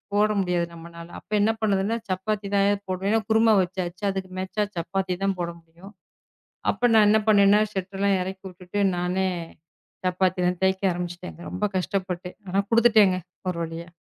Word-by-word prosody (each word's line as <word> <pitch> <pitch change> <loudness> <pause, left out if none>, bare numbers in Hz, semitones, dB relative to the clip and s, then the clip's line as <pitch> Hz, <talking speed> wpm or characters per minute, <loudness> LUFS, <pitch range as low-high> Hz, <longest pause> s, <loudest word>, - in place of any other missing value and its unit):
போட 210 +1 +4
முடியாது 175 -2 0
நம்மனால. 170 0 -10
அப்ப - - -29
என்ன 215 +2 +4
பண்ணதுன்னா 205 +1 +1
சப்பாத்தி 200 +2 -2
தான் 200 0 +4
ஏதோ 205 0 +1
போடணும். 185 +1 -1
ஏன்னா 225 0 +3
குருமா 220 0 +5
வச்சாச்சு 180 +1 -4
அதுக்கு 190 -1 -5
மேச்சா 190 +3 -1
சப்பாத்தி 180 +2 -2
தான் 195 -1 0
போட 170 - -2
முடியும். 170 +5 -16 0.8
அப்ப 245 - +1
நான் 215 -2 +6
என்ன 215 +1 +4
பண்ணேன்னா 205 0 +6
ஷட்டர் 195 0 -4
எல்லாம் 200 -1 +3
இறக்கிவிட்டுட்டு 190 +1 -5 0.2
நானே 180 +2 0 0.8
சப்பாத்தி 185 0 +1
எல்லாம் 180 0 0
தேக்க 190 0 +2
ஆரம்பிச்சிட்டேங்க. 175 0 -6
ரொம்ப 185 +3 -1
கஷ்டப்பட்டு. 185 -1 -3 0.2
ஆனா 195 +2 +2
கொடுத்துட்டேங்க 220 -5 +5 0.3
ஒரு 180 - -3
வழியா. 165 +1 -7
190 Hz, 160 wpm, -25 LUFS, 180-205 Hz, 0.8 s, நான்